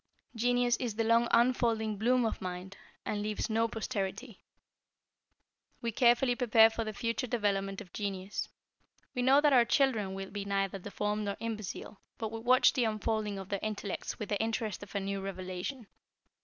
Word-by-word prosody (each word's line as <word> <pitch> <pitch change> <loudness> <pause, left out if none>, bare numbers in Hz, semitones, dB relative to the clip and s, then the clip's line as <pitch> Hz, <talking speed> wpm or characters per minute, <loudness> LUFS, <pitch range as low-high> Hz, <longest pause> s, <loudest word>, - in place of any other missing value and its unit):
Genius 245 +1 +2
is 240 -5 -3
the 225 - +1
long 230 +1 +4
unfolding 230 -3 +2
bloom 240 +4 +2
of 220 - -2
mind, 185 +1 -6 0.3
and 205 - -2
leaves 215 +2 -2
no 225 +1 +2
posterity. 225 0 -4 1.4
We 235 -1 -2
carefully 245 +2 +4
prepare 225 -2 +6
for 225 +1 -2
the 215 - -4
future 230 +3 -2
development 200 -3 -1
of 185 -4 -13
Genius. 195 -1 -3 0.6
We 250 - -1
know 265 +3 +5
that 295 -1 +4
our 245 -2 +7
children 230 -8 +1
will 195 0 -6
be 200 0 -4
neither 195 -1 -1
deformed 210 +2 -2
nor 200 0 -3
imbecile, 215 -2 -5 0.2
but 220 -1 -4
we 225 - -5
watch 250 +3 +5
the 250 - +1
unfolding 215 -1 -1
of 190 -1 -7
their 200 - -1
intellects 210 -2 -4
with 210 - -5
the 205 - 0
interest 225 -2 -2
of 205 -2 -11
a - - +2
new 195 0 -3
revelation. 190 +6 -5
215 Hz, 170 wpm, -31 LUFS, 200-235 Hz, 1.4 s, our